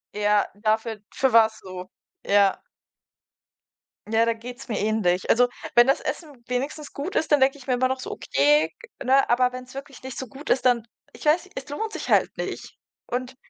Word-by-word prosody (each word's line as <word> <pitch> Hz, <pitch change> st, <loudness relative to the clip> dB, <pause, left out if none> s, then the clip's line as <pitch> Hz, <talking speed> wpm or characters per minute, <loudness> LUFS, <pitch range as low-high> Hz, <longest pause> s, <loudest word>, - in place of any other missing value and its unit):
Ja, 210 Hz, 0 st, +3 dB
dafür 220 Hz, +1 st, -1 dB
für 265 Hz, -3 st, +1 dB
was 220 Hz, -1 st, +5 dB
so? 185 Hz, -1 st, -9 dB, 0.4 s
Ja. 200 Hz, -1 st, +3 dB, 1.5 s
Ja, 225 Hz, +1 st, +4 dB
da 230 Hz, -, +2 dB
geht's 245 Hz, +3 st, -10 dB
mir 220 Hz, -, -2 dB
ähnlich. 205 Hz, -4 st, 0 dB
Also 245 Hz, +1 st, +5 dB, 0.3 s
wenn 240 Hz, +2 st, +7 dB
das 270 Hz, -, +2 dB
Essen 315 Hz, -4 st, -4 dB, 0.2 s
wenigstens 280 Hz, +4 st, -3 dB
gut 295 Hz, +7 st, -5 dB
ist, 315 Hz, -, 0 dB
dann 295 Hz, -, +6 dB
denke 270 Hz, +2 st, +3 dB
ich 270 Hz, -, -15 dB
mir 255 Hz, -, +2 dB
immer 255 Hz, +1 st, +2 dB
noch 260 Hz, 0 st, -3 dB
so: -, -, -6 dB
„Okay“, 150 Hz, +3 st, +2 dB, 0.3 s
ne? 270 Hz, +2 st, +3 dB
Aber 250 Hz, +1 st, +3 dB
wenn's 255 Hz, 0 st, -9 dB
wirklich 275 Hz, -1 st, -9 dB
nicht 260 Hz, -1 st, -7 dB
so 260 Hz, -, -5 dB
gut 280 Hz, +4 st, -10 dB
ist, 260 Hz, -, +2 dB
dann 240 Hz, -2 st, +3 dB, 0.3 s
ich -, -, -12 dB
weiß, 340 Hz, +5 st, +2 dB
es 265 Hz, -, -7 dB
lohnt 435 Hz, +10 st, -4 dB
sich -, -, -5 dB
halt -, -, +3 dB
nicht. -, -, -5 dB, 0.3 s
Und 255 Hz, +1 st, -4 dB
245 Hz, 190 wpm, -24 LUFS, 220-270 Hz, 1.5 s, wenn